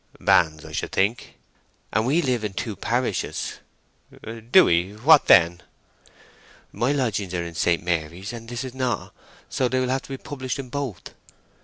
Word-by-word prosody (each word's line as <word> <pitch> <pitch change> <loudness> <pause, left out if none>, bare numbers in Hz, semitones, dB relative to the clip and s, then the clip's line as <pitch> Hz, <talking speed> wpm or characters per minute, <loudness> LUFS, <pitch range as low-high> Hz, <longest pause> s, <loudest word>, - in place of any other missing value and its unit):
"Banns, 80 -2 +3
I - - -10
should - - -3
think." 100 +5 -1 0.6
"And 110 +3 +1
we 160 +6 +2
live 125 -5 0
in 105 -2 -3
two 110 +2 -4
parishes." 120 +5 -2 0.9
"Do 185 +8 +8
we? 85 +4 +1
What 135 +8 +5
then?" 85 0 +6 1.1
"My 120 +6 0
lodgings 105 -9 -1
are 85 - -1
in 85 - -7
St. 85 +1 +1
Mary's, 85 +4 -3
and 115 -1 -9
this 120 +2 -4
is 130 -2 -7
not. 130 -4 -2 0.3
So 130 - 0
they 130 +1 0
will 130 -1 0
have 130 +1 0
to - - -15
be 135 - -4
published 130 -2 -5
in 135 -2 -7
both." 130 -8 -5
115 Hz, 170 wpm, -24 LUFS, 90-130 Hz, 1.1 s, Do